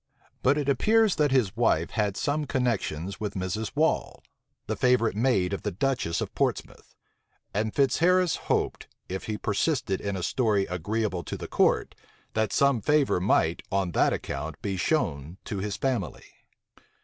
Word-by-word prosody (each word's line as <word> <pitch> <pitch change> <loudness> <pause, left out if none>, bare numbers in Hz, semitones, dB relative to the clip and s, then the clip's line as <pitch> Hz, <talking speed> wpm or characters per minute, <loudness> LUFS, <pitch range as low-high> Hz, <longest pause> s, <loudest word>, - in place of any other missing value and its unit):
But 140 +3 +3
it 145 -2 -1
appears 215 - +3
that 150 -1 +3
his 125 -8 +1
wife 100 -9 +1
had 105 -3 -1
some 150 +1 0
connections 100 - -2
with 105 -2 -4
Mrs. 95 +5 -3
Wall, 155 +2 0 0.4
the - - -2
favorite 125 -5 +2
maid 105 -5 +1
of 100 - -3
the - - -2
duchess 120 -5 -1
of - - -4
Portsmouth; - - -3 0.6
and 110 +2 0
Fitzharris 170 +7 +3
hoped, - - -1 0.2
if 95 +1 -4
he 110 -1 -3
persisted 105 - 0
in 100 -1 -3
a 90 - -4
story 105 -3 +1
agreeable 95 +1 -2
to - - -5
the - - -7
court, - - +2 0.4
that 110 -2 0
some 140 -5 +3
favor 150 -5 +2
might, 85 -3 +2
on 95 -3 0
that - - +3
account, 75 +2 -4
be 100 -2 -1
shown 75 -2 -1
to 100 - -4
his 100 0 -3
family. 115 - -2
105 Hz, 160 wpm, -27 LUFS, 95-135 Hz, 0.6 s, But